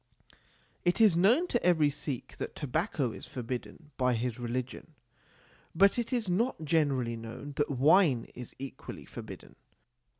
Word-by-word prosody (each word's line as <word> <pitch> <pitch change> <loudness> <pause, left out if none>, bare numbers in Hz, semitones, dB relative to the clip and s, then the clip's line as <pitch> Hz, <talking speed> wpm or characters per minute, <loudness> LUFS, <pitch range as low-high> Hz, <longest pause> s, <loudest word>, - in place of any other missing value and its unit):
It 175 +4 +2
is 215 -6 +6
known 225 - +4
to 240 - 0
every 160 -5 +4
Sikh 140 -3 -5
that - - -5
tobacco 145 - -1
is - - -9
forbidden 130 +5 -6
by 125 -2 +2
his 120 +1 -2
religion, 125 +5 -4 0.8
but 200 +6 +5
it 235 - -3
is 240 -5 0
not 185 -1 0
generally 140 -7 +1
known 115 +5 -8
that 145 - +1
wine 140 -1 +4
is 125 -1 -9
equally 135 0 -8
forbidden. - - -10
145 Hz, 140 wpm, -30 LUFS, 125-180 Hz, 0.8 s, is